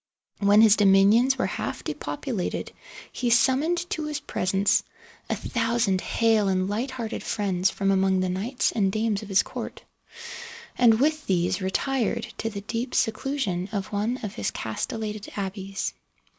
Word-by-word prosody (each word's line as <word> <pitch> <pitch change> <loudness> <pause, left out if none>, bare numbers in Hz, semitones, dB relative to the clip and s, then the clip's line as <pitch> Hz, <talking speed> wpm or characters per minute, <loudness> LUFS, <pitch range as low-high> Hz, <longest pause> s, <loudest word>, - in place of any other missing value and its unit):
When 205 +1 +5
his 220 -1 +6
dominions 205 +6 +5
were - - +1
half - - -4
depopulated, - - -4 0.4
he 245 - -1
summoned 275 +9 +2
to 310 -1 -2
his 300 -1 -3
presence 195 -6 +1 0.5
a - - +1
thousand 230 -5 0
hale 225 -3 +2
and 185 -1 +1
light 220 +7 -2
hearted 240 -4 -5
friends 195 -3 0
from 195 0 0
among 190 -1 +2
the 185 - +1
knights 210 +8 0
and 195 -4 +1
dames 215 0 0
of 210 - -10
his 195 - +4
court, - - -7 0.9
and 230 -3 +5
with 305 +2 +1
these 180 +1 +1
retired 235 +3 -1
to 225 - -1
the 200 -2 -6
deep 230 +4 -4
seclusion 215 -6 -1
of 200 -3 -3
one 215 +5 0
of 210 - -4
his 100 - -2
castellated 210 - -4
abbeys. 195 0 -3
215 Hz, 150 wpm, -25 LUFS, 195-240 Hz, 0.9 s, his